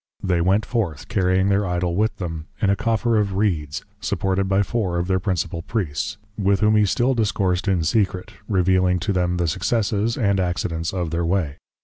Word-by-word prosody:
They 90 -3 +1
went 95 +4 +2
forth, 100 - -2
carrying 95 -2 +2
their 100 +1 +2
Idol 90 -2 -1
with 110 +3 +1
them, 80 -3 -5
in 100 - +2
a - - +3
Coffer 115 +2 +1
of 100 -2 -1
Reeds, 80 -8 -1
supported 95 0 0
by 100 +1 +3
Four 100 -4 -1
of 85 - 0
their 95 -1 +1
Principal 90 -3 -2
Priests; 100 0 -3 0.2
with 100 -1 +2
whom 105 0 +4
he 105 -1 +4
still 120 +7 +2
Discoursed 100 -5 0
in 95 -4 +2
secret, 95 +1 0
Revealing 95 -2 +2
to 100 +3 0
them 90 -1 0
the 85 -1 0
Successes, 105 +5 0
and 100 -5 +2
Accidents 85 -2 -1
of 90 -4 -3
their 85 +1 -1
way. 85 -4 0
95 Hz, 190 wpm, -22 LUFS, 90-105 Hz, 0.2 s, whom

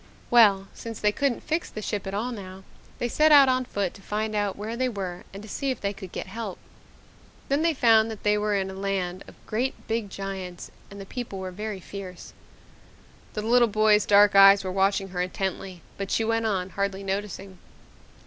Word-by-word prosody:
Well, 205 -5 +6
since 230 -1 -8
they 210 - +2
couldn't 275 +3 -1
fix 320 +2 -2
the 215 - -7
ship 205 -1 -3
at 195 - -4
all 235 +5 -2
now, 190 -4 -9 0.3
they 240 - -1
set 305 +6 +3
out 285 -2 +8
on 255 0 +1
foot 200 -7 -2
to - - -15
find 215 +2 -3
out 205 -2 0
where 215 +3 -5
they 255 +1 0
were 185 -5 -5
and 200 +1 -9
to - - -10
see 275 +5 -3
if 260 - -2
they 200 0 -2
could 190 -3 -10
get - - -5
help. 205 0 -6 0.9
Then 280 +2 +2
they 330 -1 +2
found 225 -3 +4
that 220 -2 -8
they 210 0 +3
were 210 0 0
in 190 -1 -1
a - - -8
land 190 -2 -3
of - - -14
great 245 +5 -1
big 225 -2 -2
giants, 190 -2 -6 0.2
and 200 - -11
the 195 - -7
people 235 -2 -6
were 190 -1 -5
very 210 +1 -5
fierce." 185 -1 -9 1.0
The 210 - -3
little 240 +2 +4
boy's 215 -1 +3
dark 205 0 +6
eyes 195 0 +8
were 185 - -3
watching 195 +1 +1
her 180 -1 -3
intently 185 0 -4 0.2
but 195 0 -3
she 225 - +1
went 225 0 0
on, 190 -3 -2
hardly 200 0 -2
noticing. 195 -1 -5
205 Hz, 205 wpm, -26 LUFS, 195-225 Hz, 1.0 s, out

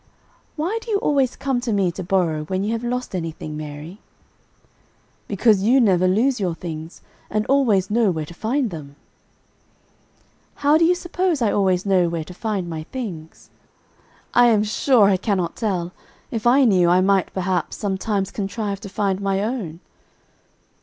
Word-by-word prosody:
"Why 355 +9 -1
do 465 - -11
you 420 - +2
always 275 -8 +1
come 265 -3 -1
to 240 -2 -2
me 195 -4 +1
to 180 - -7
borrow 170 -4 0
when 185 +3 -2
you 210 - -1
have 230 +1 -2
lost 250 -1 -3
anything, 165 -3 -5
Mary?" 150 +5 -8 1.3
"Because 210 0 +3
you 240 +7 +4
never 185 -6 +3
lose 240 +7 +2
your 180 -4 -1
things, 165 -1 -8 0.3
and 215 0 -1
always 220 -9 +2
know 225 -1 +3
where 160 -4 -2
to 170 - -11
find 230 +5 -1
them." 145 -4 -9 1.7
"How 290 +2 +6
do 330 - +5
you 355 +2 +4
suppose 355 -2 -1
I 225 -4 +2
always 190 -2 +1
know 185 -3 +3
where 165 -1 -3
to 180 - -11
find 200 -2 -3
my 160 -2 -5
things?" 180 -12 -7 0.8
"I 245 0 +6
am 215 -3 +4
sure 225 +2 +3
I 195 -1 +4
cannot 185 -3 -1
tell. 180 -6 -2 0.4
If 225 0 -1
I 265 +3 +5
knew, 185 -6 +4
I 180 +1 +5
might, 195 0 +2
perhaps, 185 -2 -2
sometimes 195 0 -2
contrive 200 0 -3
to 200 - -8
find 195 -1 -1
my 195 0 0
own." 205 -8 -4
200 Hz, 165 wpm, -22 LUFS, 180-240 Hz, 1.7 s, How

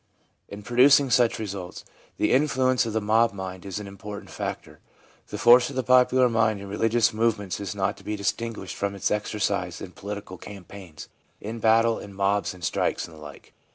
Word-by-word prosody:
In 100 +1 -9
producing 130 +4 +5
such 120 0 +3
results, 95 -4 -6 0.3
the - - +1
influence 130 -3 +2
of 110 - -4
the 110 - +1
mob 110 +1 +2
mind 95 -1 -7
is 95 +2 -4
an 105 - -7
important 100 +1 -9
factor. - - -6 0.5
The - - -6
force 120 +1 +6
of 140 - -9
the 130 - -1
popular 130 0 +4
mind 115 -3 +1
in 100 - -9
religious 115 +3 +1
movements 110 -4 -1
is 100 0 -5
not 100 0 -1
to - - -16
be 105 - -3
distinguished 105 0 -3
from 100 0 -3
its 100 - -1
exercise 100 -4 -2
in 90 - -8
political 100 -2 -8
campaigns, 95 -4 -11 0.3
in 115 +2 -6
battle, 115 +1 +3
in 100 -1 -11
mobs 100 0 0
and 90 - -15
strikes, - - -1
and 85 - -14
the 80 - -14
like. 75 -2 -12
105 Hz, 190 wpm, -25 LUFS, 100-115 Hz, 0.5 s, force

